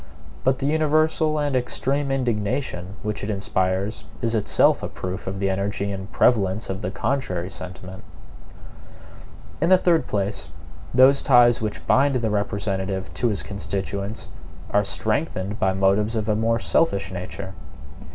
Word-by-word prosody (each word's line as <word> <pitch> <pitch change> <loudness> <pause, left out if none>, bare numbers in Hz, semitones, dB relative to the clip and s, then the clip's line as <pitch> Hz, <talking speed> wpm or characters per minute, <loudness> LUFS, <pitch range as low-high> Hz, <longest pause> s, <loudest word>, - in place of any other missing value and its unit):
But 130 0 +2
the 135 - -3
universal 155 +1 +2
and 145 -2 0
extreme 135 +3 0
indignation 115 -6 -2
which 105 -1 -3
it 100 - -3
inspires 95 0 -1 0.2
is 115 -1 -1
itself 110 -3 +3
a - - -3
proof 90 +1 -6
of 95 +1 -3
the 100 - 0
energy 100 +1 -1
and 95 0 -6
prevalence 105 -3 +2
of 95 - -5
the 90 - -2
contrary 95 -6 -2
sentiment. 95 0 -8 1.6
In 165 - +3
the 185 - +7
third 175 -3 +2
place, 100 0 -2 0.4
those 130 +3 +6
ties 120 -3 +5
which 85 -7 -4
bind 135 +6 +3
the 115 -3 0
representative 100 -2 -2
to 120 - 0
his 105 -4 -1
constituents 100 +1 -4 0.4
are 105 - +3
strengthened 105 0 -2
by 95 - +2
motives 100 +4 +2
of 110 -1 -1
a 105 - +2
more 115 +1 +1
selfish 100 -6 +1
nature. 95 +1 -6
105 Hz, 145 wpm, -23 LUFS, 95-125 Hz, 1.6 s, the